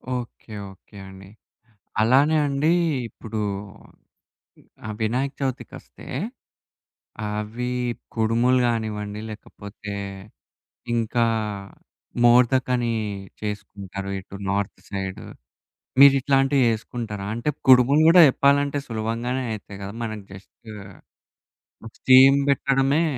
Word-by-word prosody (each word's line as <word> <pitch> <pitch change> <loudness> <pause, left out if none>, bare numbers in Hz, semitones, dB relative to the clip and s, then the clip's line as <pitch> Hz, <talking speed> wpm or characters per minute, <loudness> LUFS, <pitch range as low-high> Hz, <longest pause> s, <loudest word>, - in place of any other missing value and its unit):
Okay. 120 -2 -8 0.2
Okay 95 +2 -20
అండి. 95 0 -13 0.7
అలానే 135 +7 +4
అండి 140 +3 +1 0.4
ఇప్పుడు 110 -1 -7 1.5
ఆహ్, 110 - -4
వినాయక 130 +6 -1
చవితికస్తే 130 -2 -6 1.2
అవి 105 +4 -4 0.5
కుడుములు 115 +3 +2
గానివ్వండి, 105 -3 -3
లేకపోతే 105 -1 -9 1.0
ఇంకా 115 +1 +1 1.0
మోర్దక్ 125 +2 +4
అని 120 -1 -1 0.5
చేసుకుంటారు 100 -2 -6
ఇటు 95 +1 -11
నార్త్ 100 -1 -2
సైడు. 95 -1 -5 0.8
మీరు 140 -1 +9
ఇట్లాంటివి 135 0 +2
చేసుకుంటారా? 110 -2 -4
అంటే 120 +6 -2 0.2
కుడుములు 130 +3 +6
గూడా 175 +2 +8
చెప్పాలంటే 140 +1 +2
సులభంగానే 115 +3 -2
అయితాయి 100 -2 -8
గదా! 100 +1 -6
మనకి 110 -2 -5
జస్ట్ 95 +4 -15 1.3
స్టీమ్ 130 +1 +7
బెట్టడమే 135 +2 +2
115 Hz, 90 wpm, -23 LUFS, 105-130 Hz, 1.5 s, మీరు